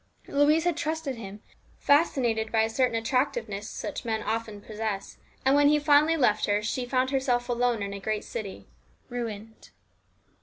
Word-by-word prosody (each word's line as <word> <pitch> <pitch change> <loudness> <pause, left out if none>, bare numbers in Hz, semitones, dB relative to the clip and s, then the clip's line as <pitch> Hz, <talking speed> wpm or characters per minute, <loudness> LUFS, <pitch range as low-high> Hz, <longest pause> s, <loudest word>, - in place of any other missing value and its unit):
Louise 295 +3 +3
had 350 -2 +1
trusted 320 -4 -2
him, 205 -1 -9 0.3
fascinated 245 -7 +2
by 220 -1 +3
a 220 - 0
certain 250 0 +1
attractiveness 225 -3 -1
such - - -5
men 220 -2 -2
often 220 -1 -3
possess. 215 -1 -5 0.3
And 265 - +5
when 290 0 +5
he 300 +1 +5
finally 300 +2 +4
left 215 -7 +2
her 205 0 +1
she 245 +3 -2
found 255 +1 +1
herself 250 -3 0
alone 240 -3 0
in 200 0 -4
a 200 - -6
great 215 +2 -2
city, 200 - -7 0.4
ruined. 225 -2 -6
235 Hz, 160 wpm, -27 LUFS, 215-275 Hz, 0.4 s, And